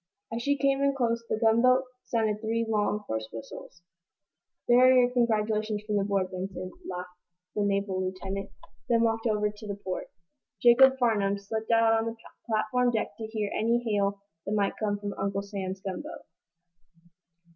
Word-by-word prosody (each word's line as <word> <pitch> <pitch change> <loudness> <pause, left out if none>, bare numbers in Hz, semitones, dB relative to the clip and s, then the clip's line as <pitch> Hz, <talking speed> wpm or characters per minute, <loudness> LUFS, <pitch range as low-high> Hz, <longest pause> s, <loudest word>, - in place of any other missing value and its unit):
As 230 - -2
she 285 +3 +1
came 275 0 +2
in 280 0 +2
close 235 -3 0
the - - 0
gunboat 240 +3 +4 0.2
sounded 215 -2 0
three 230 +1 0
long, 210 -1 0
hoarse 110 0 -4
whistles. 115 +9 -10 0.8
"There 240 0 +6
are 255 0 +7
your 250 -1 +5
congratulations 215 -3 0
from 210 -1 0
the 200 - +2
board, 195 -2 0
Benson," 185 0 -5 0.2
laughed 180 0 -5 0.4
the 210 - -1
naval 200 -2 0
lieutenant, 190 +1 -4 0.4
then 230 -1 +4
walked 225 0 +1
over 210 -1 +1
to 210 -1 -7
port. 185 -2 -5 0.5
Jacob 265 +2 +6
Farnum 205 -5 +2
slipped 220 +2 -5
out 225 -1 +4
on 225 0 +1
the 230 - -4 0.3
platform 230 +3 +1
deck 225 -2 -2
to 220 - -5
hear 215 -2 -3
any 230 +2 +2
hail 200 -2 +1 0.3
that 205 - -1
might 205 -2 +1
come 205 -2 0
from 205 0 -5
Uncle 200 0 -1
Sam's 195 -2 -5
gunboat. 190 -2 -6
215 Hz, 165 wpm, -28 LUFS, 200-230 Hz, 0.8 s, are